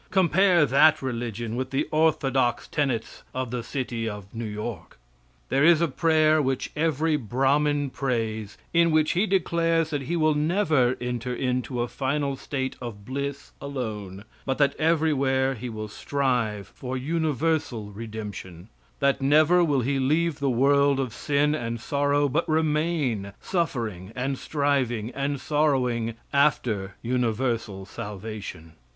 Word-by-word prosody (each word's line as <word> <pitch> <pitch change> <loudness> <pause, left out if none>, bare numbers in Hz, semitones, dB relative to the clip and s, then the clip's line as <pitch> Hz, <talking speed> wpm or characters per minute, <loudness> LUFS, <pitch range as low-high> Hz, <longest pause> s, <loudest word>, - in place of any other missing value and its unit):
Compare 185 -2 +4
that 155 +4 +5
religion 115 -2 -3
with 130 +1 -2
the 135 - -1
orthodox 135 -5 +2
tenets 135 -7 -2
of 130 -2 -2
the 125 -1 -2
city 120 -3 -3
of 105 -2 -7
New 115 0 -4
York. 105 -4 -6 0.5
There 140 - +2
is 165 0 +6
a 170 - +2
prayer 155 +1 +3
which 135 -2 -1
every 155 0 +1
Brahmin 140 +3 +1
prays, 110 -6 -2 0.2
in 170 0 +5
which 155 -1 +3
he 190 +5 +1
declares 165 -4 +1
that 145 -2 -1
he 140 +6 -2
will 155 -2 +3
never 150 -5 +2
enter 125 0 -3
into 125 -1 -1
a - - -3
final 140 +2 -1
state 130 0 -3
of 105 -5 -7
bliss 140 +2 -4
alone, 110 -8 -5 0.2
but 135 -1 -1
that 140 -1 +3
everywhere 140 -5 +2
he 125 0 -6
will 110 -1 -5
strive 120 -4 -1
for 130 0 -5
universal 150 -6 -1
redemption; 105 -4 -8 0.3
that 140 0 +2
never 155 +6 +5
will 145 -5 +2
he 135 +3 0
leave 155 +4 +1
the 140 -1 +1
world 140 +2 +3
of 130 -5 -2
sin 145 0 +1
and 115 -5 -3
sorrow, 145 +3 +1
but 160 +5 -1
remain 150 -9 0
suffering 115 - -2
and 135 +1 -2
striving 130 -6 0
and 140 +1 -2
sorrowing 130 -7 +1 0.2
after 115 -9 +1
universal 115 -4 -1
salvation. 100 -5 -7
135 Hz, 140 wpm, -26 LUFS, 115-150 Hz, 0.5 s, is